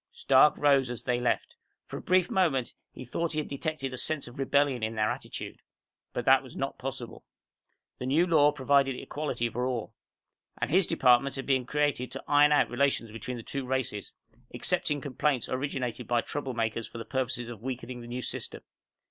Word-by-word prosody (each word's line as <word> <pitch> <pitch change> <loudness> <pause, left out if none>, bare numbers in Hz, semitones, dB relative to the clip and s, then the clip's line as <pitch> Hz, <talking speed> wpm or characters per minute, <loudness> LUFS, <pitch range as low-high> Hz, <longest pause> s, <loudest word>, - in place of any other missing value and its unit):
Stark 470 - +5
rose 140 -3 +4
as 120 -2 -5
they 125 -1 0
left. 125 - -1 0.3
For - - -7
a - - -7
brief 185 -1 +2
moment, 155 -10 +1 0.2
he 130 - -9
thought 165 +7 -2
he - - -3
had 150 - -3
detected 140 -2 -3
a - - -5
sense 155 +1 -1
of 120 +2 -11
rebellion 135 -2 +2
in 110 +1 -2
their 110 0 +1
attitude. - - -6 0.5
But - - -3
that - - +6
was - - -12
not - - -3
possible. - - -6 0.8
The 125 - -4
new 155 +6 +4
law 150 -4 +5
provided 140 -1 +2
equality 130 -3 -3
for 125 +2 -2
all. 120 -4 -3 0.7
And - - -1
his 185 +1 +4
department 135 -3 +4
had 135 - -4
been 130 -3 +1
created 145 -4 0
to - - -6
iron 145 0 +5
out 150 - +4
relations 125 -3 +1
between 115 +3 -5
the 115 - -8
two 140 +3 -4
races 125 -5 -2 0.4
excepting 150 -5 0
complaints 135 -1 0
originated 130 -3 -3
by 120 -1 +2
troublemakers 115 -5 -2
for - - -8
the 115 - -6
purpose 130 -4 -1
of 120 -3 -7
weakening 125 -1 -5
the 120 - -10
New 125 +1 -4
System. - - -5
130 Hz, 190 wpm, -29 LUFS, 120-145 Hz, 0.8 s, that